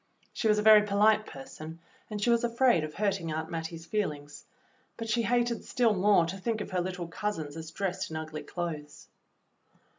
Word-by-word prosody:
She 225 Hz, -, -1 dB
was 210 Hz, -1 st, +4 dB
a 210 Hz, -, +1 dB
very 215 Hz, -1 st, +9 dB
polite 210 Hz, +1 st, +3 dB
person, 155 Hz, +3 st, -9 dB, 0.3 s
and 210 Hz, -1 st, -4 dB
she 235 Hz, +4 st, +2 dB
was 235 Hz, 0 st, +3 dB
afraid 235 Hz, -6 st, +3 dB
of 155 Hz, 0 st, -6 dB
hurting 195 Hz, -5 st, -1 dB
Aunt 160 Hz, +1 st, -4 dB
Mattie's 165 Hz, 0 st, -5 dB
feelings, 150 Hz, -8 st, -3 dB, 0.5 s
but 230 Hz, -, -5 dB
she 225 Hz, +2 st, +1 dB
hated 240 Hz, 0 st, +1 dB
still 235 Hz, -3 st, +2 dB
more 195 Hz, -2 st, +4 dB
to 175 Hz, +4 st, -5 dB
think 225 Hz, +3 st, -1 dB
of 210 Hz, -, -6 dB
her 180 Hz, -1 st, 0 dB
little 180 Hz, -1 st, -4 dB
cousins 165 Hz, -5 st, -4 dB
as 160 Hz, -1 st, -7 dB
dressed 185 Hz, +2 st, -3 dB
in 160 Hz, -, -4 dB
ugly 155 Hz, -1 st, -5 dB
clothes. 155 Hz, -4 st, -6 dB
185 Hz, 185 wpm, -29 LUFS, 160-215 Hz, 0.5 s, very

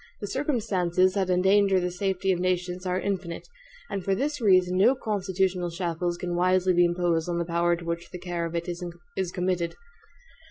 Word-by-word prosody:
The -, -, -4 dB
circumstances 200 Hz, -, +1 dB
that 190 Hz, -2 st, 0 dB
endanger 190 Hz, +1 st, +4 dB
the 180 Hz, 0 st, -2 dB
safety 190 Hz, +1 st, 0 dB
of 180 Hz, -, 0 dB
nations 180 Hz, 0 st, -1 dB
are 180 Hz, 0 st, 0 dB
infinite, 185 Hz, -4 st, -3 dB, 0.4 s
and 195 Hz, -2 st, -4 dB
for 195 Hz, +1 st, +1 dB
this 290 Hz, +4 st, -2 dB
reason 185 Hz, -4 st, +4 dB
no 245 Hz, +7 st, +5 dB
constitutional 190 Hz, -5 st, -1 dB
shackles 175 Hz, 0 st, -2 dB
can 175 Hz, 0 st, -4 dB
wisely 185 Hz, +1 st, +3 dB
be 175 Hz, 0 st, +5 dB
imposed 175 Hz, -1 st, 0 dB
on 170 Hz, -, -1 dB
the 170 Hz, -, -1 dB
power 170 Hz, 0 st, +1 dB
to 170 Hz, 0 st, -9 dB
which 170 Hz, +1 st, -4 dB
the -, -, -7 dB
care 175 Hz, -1 st, -3 dB
of 165 Hz, -, -7 dB
it 170 Hz, +1 st, -2 dB
is 175 Hz, +1 st, -5 dB
committed. 180 Hz, -2 st, -1 dB
180 Hz, 185 wpm, -26 LUFS, 175-190 Hz, 0.4 s, no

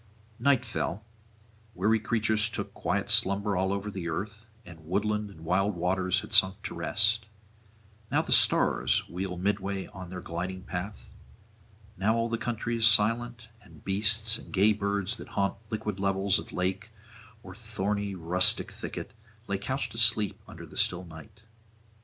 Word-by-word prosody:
Night 130 Hz, +1 st, +3 dB
fell; 110 Hz, -2 st, -4 dB, 0.7 s
weary 110 Hz, +5 st, +2 dB
creatures 110 Hz, 0 st, +1 dB
took -, -, -6 dB
quiet -, -, -2 dB
slumber 100 Hz, +1 st, +4 dB
all 95 Hz, +1 st, 0 dB
over 100 Hz, +1 st, -3 dB, 0.2 s
earth, 105 Hz, +6 st, -5 dB, 0.2 s
and 85 Hz, -3 st, -13 dB
woodland 105 Hz, +3 st, -1 dB
and 90 Hz, -5 st, -14 dB
wild 95 Hz, +3 st, +1 dB
waters 90 Hz, +1 st, 0 dB
had -, -, -8 dB
sunk 95 Hz, 0 st, +4 dB
to -, -, -5 dB
rest; 110 Hz, +1 st, +1 dB, 0.8 s
now -, -, +1 dB
the -, -, -7 dB
stars -, -, +3 dB
wheel 90 Hz, +1 st, -5 dB
midway 100 Hz, 0 st, -2 dB
on 95 Hz, -2 st, -9 dB
their 90 Hz, 0 st, -6 dB
gliding 90 Hz, +2 st, -5 dB
path, 95 Hz, +3 st, -6 dB, 0.9 s
now 105 Hz, +5 st, +2 dB
all 115 Hz, 0 st, 0 dB
the 115 Hz, 0 st, -2 dB
country 120 Hz, 0 st, -2 dB
is 115 Hz, -1 st, +5 dB
silent, 115 Hz, +2 st, +2 dB
and 80 Hz, -7 st, -18 dB
beasts 110 Hz, +3 st, +4 dB
and -, -, -13 dB
gay 100 Hz, +2 st, +4 dB
birds 100 Hz, -1 st, -1 dB
that -, -, -10 dB
haunt 100 Hz, 0 st, +1 dB
liquid 105 Hz, -3 st, -4 dB
levels 95 Hz, 0 st, +1 dB
of -, -, -10 dB
lake 95 Hz, +4 st, -2 dB, 0.5 s
or 95 Hz, -, -10 dB
thorny 105 Hz, -2 st, -3 dB
rustic 90 Hz, +1 st, +2 dB
thicket -, -, -7 dB, 0.3 s
lay 100 Hz, -2 st, -2 dB
couched 130 Hz, +7 st, -3 dB
asleep 110 Hz, -3 st, +3 dB
under -, -, -10 dB
the -, -, -12 dB
still 90 Hz, +1 st, 0 dB
night. 100 Hz, +7 st, -13 dB
100 Hz, 150 wpm, -28 LUFS, 95-110 Hz, 0.9 s, is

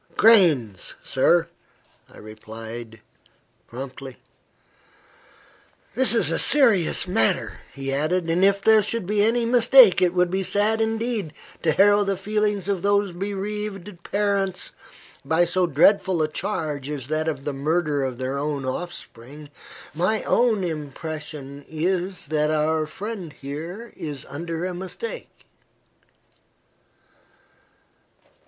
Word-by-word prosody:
"Grains, 155 Hz, -, +4 dB
sir," -, -, +2 dB, 0.6 s
I -, -, -16 dB
replied, 110 Hz, +1 st, -10 dB, 0.7 s
promptly. 130 Hz, +1 st, -8 dB, 1.8 s
"This 255 Hz, 0 st, +2 dB
is -, -, +2 dB
a -, -, 0 dB
serious 225 Hz, -, +3 dB
matter," 110 Hz, -11 st, 0 dB
he 135 Hz, 0 st, -4 dB
added; 165 Hz, +5 st, 0 dB
"and 170 Hz, +3 st, +1 dB
if 200 Hz, 0 st, +3 dB
there 220 Hz, -1 st, +6 dB
should 220 Hz, 0 st, -3 dB
be 205 Hz, +2 st, +1 dB
any 230 Hz, +2 st, +2 dB
mistake, 240 Hz, -4 st, +6 dB
it 180 Hz, -1 st, +2 dB
would 180 Hz, -1 st, +2 dB
be 190 Hz, +1 st, 0 dB
sad 210 Hz, +4 st, +1 dB
indeed 225 Hz, -6 st, -2 dB, 0.3 s
to 160 Hz, -, +2 dB
harrow 205 Hz, +4 st, +5 dB
the 195 Hz, -1 st, -1 dB
feelings 210 Hz, -1 st, -1 dB
of 195 Hz, -3 st, -1 dB
those 200 Hz, 0 st, +1 dB
bereaved 200 Hz, 0 st, -5 dB
parents 200 Hz, -1 st, -1 dB, 0.5 s
by 160 Hz, +5 st, +2 dB
so 180 Hz, +1 st, +1 dB
dreadful 170 Hz, +2 st, +3 dB
a -, -, +1 dB
charge 155 Hz, -5 st, -4 dB
as 140 Hz, -4 st, -5 dB
that 155 Hz, +1 st, -1 dB
of 145 Hz, -4 st, -3 dB
the 145 Hz, -, -2 dB
murder 150 Hz, 0 st, 0 dB
of 130 Hz, -2 st, -3 dB
their 130 Hz, +2 st, -3 dB
own 145 Hz, -2 st, -3 dB
offspring. 145 Hz, -1 st, -7 dB, 0.4 s
My 180 Hz, +8 st, 0 dB
own 230 Hz, -5 st, +2 dB
impression 150 Hz, -3 st, -6 dB
is, 180 Hz, +4 st, -2 dB
that 150 Hz, -1 st, +1 dB
our 155 Hz, 0 st, 0 dB
friend 190 Hz, -2 st, -7 dB
here 165 Hz, +11 st, -8 dB
is 145 Hz, -4 st, -6 dB
under 165 Hz, +3 st, -5 dB
a 185 Hz, -, -3 dB
mistake." 325 Hz, -, -8 dB
175 Hz, 120 wpm, -23 LUFS, 150-205 Hz, 1.8 s, there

